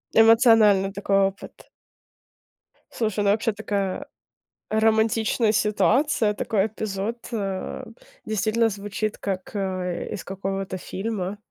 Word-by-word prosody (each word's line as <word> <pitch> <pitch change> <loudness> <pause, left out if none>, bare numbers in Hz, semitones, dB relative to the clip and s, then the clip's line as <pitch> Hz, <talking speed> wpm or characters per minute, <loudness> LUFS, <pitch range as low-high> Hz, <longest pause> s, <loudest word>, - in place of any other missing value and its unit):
Эмоциональный 225 -4 +6
такой 200 0 +1
опыт. 195 +1 -10 1.2
Слушай, 215 -2 -1
ну, 200 - +4
вообще 225 +1 0
такая, 205 +4 -3 0.6
романтичная 220 +1 +2
ситуация, 215 - +2
такой 205 0 0
эпизод, 215 +1 -4
э. 195 -4 -4 0.4
Действительно 220 +2 +1
звучит 205 +1 -4
как, 190 -2 -4
э, 185 -3 -3
из - - -6
какого-то 195 0 -4
фильма. 200 0 -4
210 Hz, 100 wpm, -24 LUFS, 195-220 Hz, 1.2 s, Эмоциональный